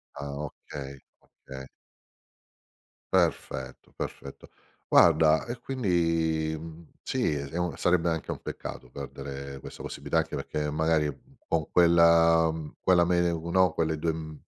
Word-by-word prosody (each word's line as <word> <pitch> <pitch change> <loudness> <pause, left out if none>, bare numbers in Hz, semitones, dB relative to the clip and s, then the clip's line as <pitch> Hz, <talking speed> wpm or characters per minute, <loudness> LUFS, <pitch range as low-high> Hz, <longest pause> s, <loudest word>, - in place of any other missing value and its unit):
Ah, 70 0 -6
okay, 70 -1 -9 0.2
okay. 65 0 -11 1.5
Perfetto, 65 0 -1
perfetto. 70 - -7 0.4
Guarda, 80 -1 +5
e 120 0 -5
quindi, 85 -10 0
mhmm, 80 +1 -11
sì, - - 0
è 70 -1 -3
s - - -14
un 90 -1 -1
sarebbe 90 -1 +2
anche 80 -2 -3
un - - -3
peccato 65 - -7
perdere 70 0 -7
questa - - -10
possibilità, - - -3
anche - - -2
perché 75 -1 -3
magari, 80 0 +1
mhmm, 70 -1 -10
con 80 -3 -1
quella, 85 -1 +5
mhmm, 80 -2 -7
quella 90 -2 +4
me 90 0 +2
no, 85 +2 +2
quelle 80 -1 0
2 80 +1 0
m 80 -2 -7
80 Hz, 135 wpm, -28 LUFS, 70-85 Hz, 1.5 s, Guarda